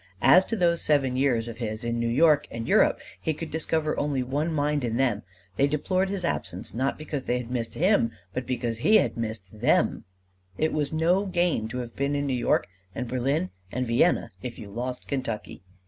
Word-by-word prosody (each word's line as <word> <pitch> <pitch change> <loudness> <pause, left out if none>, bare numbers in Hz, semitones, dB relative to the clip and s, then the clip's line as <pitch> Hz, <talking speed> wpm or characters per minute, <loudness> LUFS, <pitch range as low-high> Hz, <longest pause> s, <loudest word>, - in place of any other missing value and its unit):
As 180 +9 +7
to 225 - -2
those 170 -4 +2
seven 135 -4 +2
years 125 -4 +1
of 115 -1 -7
his 110 -2 -4
in 120 0 -1
New 120 - 0
York 150 +4 +4
and 115 0 -5
Europe, - - +4 0.2
he 160 - -1
could 160 0 -6
discover 160 0 0
only 140 -3 0
one 145 +6 -1
mind 150 -2 0
in 115 -1 -1
them: 120 -6 +1 0.4
they 140 - +4
deplored 185 +6 0
his 195 -3 -2
absence 105 - -3
not 130 +4 -1
because 150 -3 -5
they 125 - +1
had 125 -1 -6
missed 115 -2 -2
him, 180 - +3 0.2
but 130 -1 -4
because 120 -2 -2
he 215 - +4
had - - +3
missed 110 -3 -5
them: - - +2 0.5
it 155 +1 +1
was 150 -2 -1
no 175 +5 +2
gain 175 -11 +1
to 115 - -5
have 120 -2 -6
been 140 +1 0
in 145 0 0
New 135 - 0
York 125 - +2 0.3
and 125 - -3
Berlin 135 +8 0 0.2
and 125 0 -1
Vienna 115 0 +2
if 120 0 -6
you 100 -2 -9
lost 125 +3 -4
Kentucky! 125 -10 -4
135 Hz, 205 wpm, -26 LUFS, 120-155 Hz, 0.5 s, As